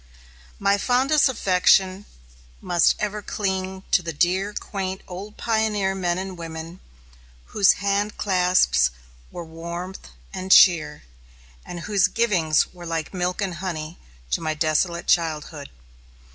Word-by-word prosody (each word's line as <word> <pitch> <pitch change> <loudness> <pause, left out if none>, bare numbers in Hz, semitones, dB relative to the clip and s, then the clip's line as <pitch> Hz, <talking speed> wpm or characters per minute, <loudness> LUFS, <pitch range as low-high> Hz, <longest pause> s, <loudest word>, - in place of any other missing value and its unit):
My 200 0 +2
fondest 265 +6 +3
affection 190 -3 +2 0.5
must 170 - +2
ever 210 0 -3
cling 190 -2 -3
to 180 - +4
the 170 -1 -5
dear, 185 +6 0
quaint 190 -2 -5
old 195 +4 -9
pioneer 215 -4 0
men 180 -2 -1
and 190 0 -5
women, 165 +1 -8 0.7
whose 200 -3 +5
hand 200 +1 -1
clasps 180 - +3 0.4
were 175 -1 -8
warmth 170 +3 -7 0.3
and 190 0 -5
cheer, 170 - +5 0.6
and 175 - -8
whose 200 0 +2
givings 180 -8 +1
were 175 -1 -10
like 165 0 -3
milk 180 +2 -2
and 180 -3 -4
honey 170 -2 -5 0.3
to - - 0
my 155 -1 -2
desolate 170 +3 0
childhood. 155 -3 -1
185 Hz, 125 wpm, -23 LUFS, 170-200 Hz, 0.7 s, whose